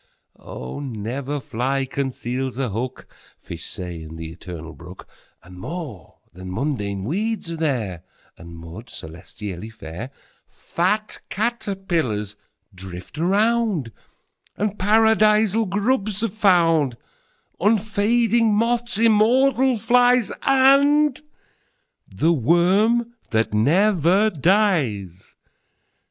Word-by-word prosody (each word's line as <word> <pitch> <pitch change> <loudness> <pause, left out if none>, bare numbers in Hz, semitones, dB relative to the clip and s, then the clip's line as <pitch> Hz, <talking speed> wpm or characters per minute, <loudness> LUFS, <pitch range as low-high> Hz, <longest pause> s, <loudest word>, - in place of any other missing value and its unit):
25Oh! 65 - -7
never 130 +3 -4
fly 135 +3 -2
conceals 130 -1 -3
a 135 -3 -1
hook,26Fish 115 -6 -8
say, 90 -2 -6
in 80 0 -9
the 80 0 -7
Eternal 80 -2 -9
Brook,27But 90 +2 -15
more 130 - -7 0.2
than 90 +1 -8
mundane 100 -5 -2
weeds 200 - -2
are - - -3
there,28And 100 - -5
mud, 85 +6 -10
celestially 90 +5 -8
fair;29Fat 135 - -4
caterpillars 190 - -2 0.4
drift 95 - -10
around,30And 205 - -2
Paradisal 215 +1 +3
grubs 210 +1 0
are 230 - +1
found;31Unfading 205 - +1
moths, 230 0 +1
immortal 240 +4 +4
flies,32And 265 +5 +3 0.9
the 165 +2 +1
worm 190 - +2 0.2
that 110 -2 0
never 185 - +3
dies. 145 - 0
165 Hz, 80 wpm, -22 LUFS, -, 0.9 s, immortal